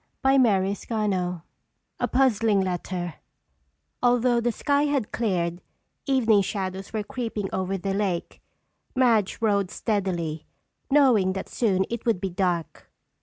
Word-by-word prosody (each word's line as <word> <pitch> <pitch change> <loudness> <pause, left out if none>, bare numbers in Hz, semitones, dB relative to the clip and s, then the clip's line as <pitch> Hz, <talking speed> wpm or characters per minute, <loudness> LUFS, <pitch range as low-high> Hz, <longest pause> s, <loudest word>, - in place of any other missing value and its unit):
CHAPTER 250 -8 +4
III 195 -4 -2 0.6
A - - +1
Puzzling 230 -5 +3
Letter 180 -1 -3 0.9
Although 245 -1 +3
the 240 +1 +1
sky 285 +5 +1
had 280 -7 -1
cleared, 180 -6 -1 0.5
evening 230 -6 +4
shadows 190 -1 -4
were 215 -1 -2
creeping 225 -3 -4
over 190 +1 -1
the 195 +1 -2
lake. 195 -4 -2 0.5
Madge 230 -6 +3
rowed 200 -4 +2
steadily, 175 -9 -2 0.4
knowing 250 -10 +4
that 190 - -5
soon 190 -5 +1
it 235 -1 -3
would 225 -6 +2
be 190 0 -3
dark. 175 -2 -2
205 Hz, 120 wpm, -25 LUFS, 185-235 Hz, 0.9 s, CHAPTER